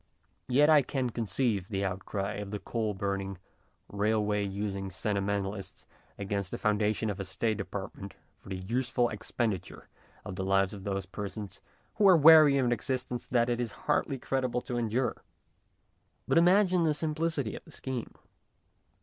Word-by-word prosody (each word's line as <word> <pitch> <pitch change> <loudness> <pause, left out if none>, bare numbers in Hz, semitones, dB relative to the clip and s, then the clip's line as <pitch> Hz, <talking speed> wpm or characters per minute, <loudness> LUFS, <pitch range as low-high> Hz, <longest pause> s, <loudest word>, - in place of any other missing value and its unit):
Yet 140 +4 +4
I 155 -2 +7
can 130 -2 -2
conceive 110 -3 -1
the 100 -2 -2
outcry 95 +1 -3
of 105 -1 -5
the 105 - -3
coal 110 -1 -2
burning, 100 -1 -3 0.5
railway 105 0 0
using 100 -1 -3
sentimentalists 100 0 -3 0.3
against 100 -1 -3
the - - -4
foundation 105 0 +1
of 100 - -7
a - - -2
State 100 +3 -1
department 100 0 -6 0.2
for - - -14
the 95 - -3
useful 120 +5 0
expenditure 110 -2 -3 0.4
of 95 - -6
the 95 - -2
lives 95 +1 +2
of 100 -2 -9
those 100 -1 -2
persons 100 +1 -7 0.4
who 210 -2 +5
are 185 -3 +8
weary 155 -2 +8
of 130 - +2
an 120 - +1
existence 125 0 -2
that 120 -1 +2
it 120 -1 0
is 115 -4 -3
hardly 135 - +1
creditable 130 -1 -1
to 125 - -5
endure. 120 +2 -1 1.1
But - - +4
imagine 185 +1 +4
the 155 -2 +2
simplicity 155 -5 -1
of - - -9
the - - -16
scheme. 130 -3 -5
105 Hz, 160 wpm, -30 LUFS, 100-130 Hz, 1.1 s, are